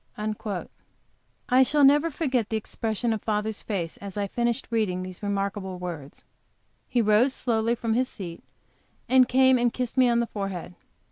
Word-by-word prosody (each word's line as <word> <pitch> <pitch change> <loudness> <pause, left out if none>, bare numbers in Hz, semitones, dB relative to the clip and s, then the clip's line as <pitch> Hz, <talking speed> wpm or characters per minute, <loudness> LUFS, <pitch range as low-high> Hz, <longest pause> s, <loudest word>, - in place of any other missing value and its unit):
I 255 +1 +5
shall 285 +3 +3
never 290 +4 +5
forget 265 -8 -1
the 220 - 0
expression 225 +1 -2
of 215 - -4
father's 215 0 -2
face, 180 -6 -3
as 200 0 -8
I 205 - 0
finished 235 +5 -1
reading 195 -5 0
these 185 -1 -8
remarkable 200 -2 -2
words. 170 -6 -7 0.7
He 245 -2 +2
rose 220 +5 +3
slowly 230 -1 0
from 230 -1 -1
his 255 +2 +1
seat, 175 -5 -8 0.6
and 255 -1 +5
came 260 0 +5
and 240 0 +2
kissed 250 +1 -4
me 255 -1 +5
on 235 0 +3
the 235 - +1
forehead. 195 -5 -5
225 Hz, 160 wpm, -26 LUFS, 200-250 Hz, 0.7 s, I